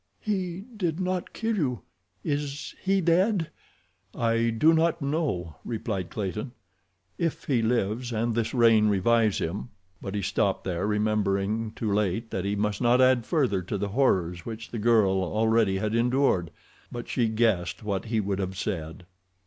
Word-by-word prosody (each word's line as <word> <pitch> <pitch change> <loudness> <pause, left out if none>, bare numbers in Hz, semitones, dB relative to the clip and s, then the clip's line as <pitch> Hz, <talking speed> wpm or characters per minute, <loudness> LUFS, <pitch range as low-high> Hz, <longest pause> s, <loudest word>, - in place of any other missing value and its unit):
"He 190 -2 -3
did 175 -5 -1
not 185 -1 -2
kill 225 0 -1
you. 130 - -1 0.4
Is 145 -1 -3
he 195 0 +2
dead?" 175 +1 +2 0.6
"I 115 0 +1
do 150 +9 +4
not 165 +1 +2
know," 140 - -2
replied 105 -6 -3
Clayton. 105 +4 -4 0.7
"If 165 -2 -1
he 125 -5 +1
lives 115 +1 0
and 115 +1 0
this 115 -1 -1
rain 115 -3 +5
revives 105 +2 +3
him—" 100 +9 -3 0.3
But 100 +1 -5
he 100 - -2
stopped 95 +1 0
there, 90 +1 -2
remembering 105 0 0
too 110 -3 -2
late 105 +2 0
that 95 - -2
he 100 +1 0
must 105 0 -1
not 120 +1 +4
add 130 -2 +4
further 130 - +1
to 95 +3 -4
the 100 +1 -2
horrors 90 -8 +1
which 115 0 -7
the 115 - -4
girl 105 -4 +3
already 110 0 +2
had 105 +2 -1
endured. 120 - +2 0.4
But 120 -1 -6
she 120 -2 +1
guessed 110 -6 0
what 100 -2 -2
he 110 0 0
would 100 -1 -1
have 95 -1 -3
said. 85 -4 -4
115 Hz, 160 wpm, -27 LUFS, 100-130 Hz, 0.7 s, rain